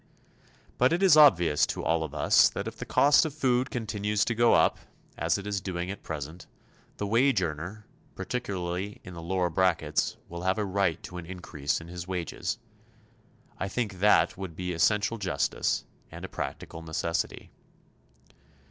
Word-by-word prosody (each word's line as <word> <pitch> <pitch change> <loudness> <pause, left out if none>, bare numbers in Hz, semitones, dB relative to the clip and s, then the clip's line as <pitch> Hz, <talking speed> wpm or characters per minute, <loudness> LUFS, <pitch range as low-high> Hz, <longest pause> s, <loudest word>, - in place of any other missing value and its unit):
But 125 +1 +4
it 175 +3 +1
is 185 -5 +7
obvious 90 - +6
to - - -4
all 80 0 +1
of 75 -1 -6
us - - +5
that - - -5
if - - -6
the - - -7
cost 145 +1 +5
of 155 -3 -4
food 125 -3 +1
continues 105 -3 -1
to 115 - 0
go 120 +1 +4
up, - - +3 0.4
as - - +1
it 100 - -7
is 100 -2 -2
doing 90 -1 -3
at 100 - -8
present, 80 +3 -7 0.5
the 105 - -2
wage 115 0 +3
earner, 85 +7 -5 0.3
particularly 100 -4 -4
in 90 - -10
the 85 - -8
lower 90 +1 -1
brackets, 85 -4 +1
will 85 0 -7
have 95 +3 +1
a 105 - 0
right 95 -3 0
to 90 - -8
an 85 -2 -7
increase 80 -6 -3
in 85 - -11
his 90 +1 -7
wages. 90 +1 -3 1.0
I - - -1
think 100 -3 -3
that 95 -4 +4
would 95 -4 -6
be 90 +1 -3
essential 105 +6 +1
justice 90 -8 -1 0.2
and - - -8
a - - -6
practical 80 - -6
necessity. 80 +1 -3
95 Hz, 170 wpm, -28 LUFS, 85-105 Hz, 1.0 s, is